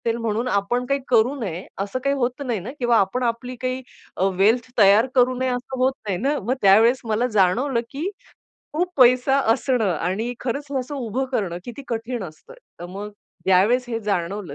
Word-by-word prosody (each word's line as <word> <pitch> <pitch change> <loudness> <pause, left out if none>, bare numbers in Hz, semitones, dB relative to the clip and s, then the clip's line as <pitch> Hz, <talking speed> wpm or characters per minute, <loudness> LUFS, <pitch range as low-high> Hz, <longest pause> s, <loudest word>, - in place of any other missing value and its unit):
ते 230 - +3
म्हणून 230 +1 -2
आपण 240 +3 0
काही 275 +2 0
करू 235 +2 +4
नये, 185 -6 -4
असं 200 +5 -2
काही 275 0 +1
होत 255 0 -2
नाही 235 -5 -1
ना 200 +8 -7
किंवा 240 -2 +3
आपण 220 +6 +1
आपली 245 +2 -2
काही 255 0 -2 0.4
अ, - - 0
वेल्थ 225 +6 +2
तयार 210 +3 +6
करू 255 0 +4
नये 260 0 0
असं 250 +1 -4
होत 260 +1 +3
नाही 190 -3 0
ना. 280 +8 0
मग 235 +6 -1
त्यावेळेस 220 +6 +5
मला 225 +2 +1
जाणवलं 230 +6 +2
की 305 +7 -3 0.6
खूप 355 +4 -1
पैसा 255 +1 +5
असणं 245 -4 0
आणि 190 +9 -2
खरंच 275 +3 -3
हे 270 - 0
असं 260 +3 -5
उभं 255 -1 -2
करणं, 190 -8 -1
किती 245 +4 -8
कठीण 235 0 -3
असतं. 155 - -12 0.3
तर 175 - -6
मग 200 +3 -7 0.4
ज्यावेळेस 200 +7 +4
हे 230 -2 -2
जाणवलं, 195 -4 -3
235 Hz, 190 wpm, -22 LUFS, 205-255 Hz, 0.6 s, तयार